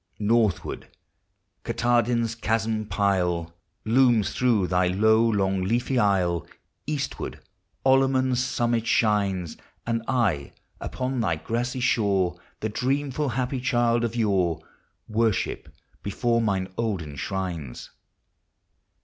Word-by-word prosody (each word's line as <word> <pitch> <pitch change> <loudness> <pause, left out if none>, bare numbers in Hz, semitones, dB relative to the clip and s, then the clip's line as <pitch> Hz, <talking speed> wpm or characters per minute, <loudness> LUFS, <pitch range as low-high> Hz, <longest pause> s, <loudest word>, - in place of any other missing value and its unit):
Northward, 110 -3 0 0.8
Katahdin's 120 -1 +1
chasmed 110 -1 -1
pile 90 -4 0 0.3
Looms 120 -2 +3
through 120 -6 +2
thy 90 +1 +2
low, 110 +5 +4
long, 95 -3 +1
leafy 120 +6 0
aisle; 90 -5 +1 0.4
Eastward, 145 -2 -3 0.5
Olamon's 130 -1 +3
summit 120 -2 0
shines; 100 -6 +1 0.3
And 115 0 -1
I 105 - 0 0.3
upon 130 0 -3
thy 85 -8 +1
grassy 120 +9 -3
shore, 95 -7 +1 0.2
The 110 - -1
dreamful, 135 +5 -1
happy 125 +2 -2
child 120 -2 +2
of 115 0 -2
yore, 95 -7 +1 0.5
Worship 110 -1 0 0.3
before 115 +3 0
mine 95 -4 -1
olden 95 -11 -2
shrines. 85 -5 -5
110 Hz, 100 wpm, -25 LUFS, 95-120 Hz, 0.8 s, low